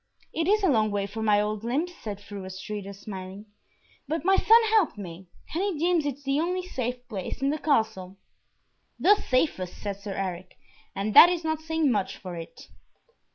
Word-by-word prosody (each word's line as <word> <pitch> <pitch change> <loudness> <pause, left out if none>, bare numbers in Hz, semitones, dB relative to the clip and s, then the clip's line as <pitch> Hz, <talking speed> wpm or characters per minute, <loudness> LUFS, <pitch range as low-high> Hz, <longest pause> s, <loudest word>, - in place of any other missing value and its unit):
"It 325 0 -1
is 420 +1 +3
a - - +4
long 220 -8 +3
way 205 -1 -1
for 210 +3 -6
my 210 -2 +3
old 210 0 -2
limbs," 285 +10 -1
said 210 - -7
Fru 200 -1 -9
Astrida, 195 +2 -6
smiling, 195 0 -8 0.6
"but 315 +2 -3
my 385 +1 +5
son 450 +4 +6
helped 420 - +3
me, 180 -2 -9 0.3
and 335 - 0
he 395 -5 -1
deems 335 -1 +2
it 285 0 -5
the 275 +1 0
only 360 +2 -1
safe 250 -7 -4
place 195 -5 -5
in 275 +1 +1
the 305 - -2
Castle." 220 -10 0 0.8
"The 405 - +6
safest," 255 - -1
said 200 -2 -5
Sir 200 -1 -6
Eric, 185 -2 -5 0.4
"and 200 +2 -2
that 345 - +10
is 355 -2 -2
not 315 -1 -1
saying 320 -3 +1
much 200 -4 -1
for 180 -3 -8
it." 165 -1 -9
225 Hz, 190 wpm, -27 LUFS, 195-320 Hz, 0.8 s, that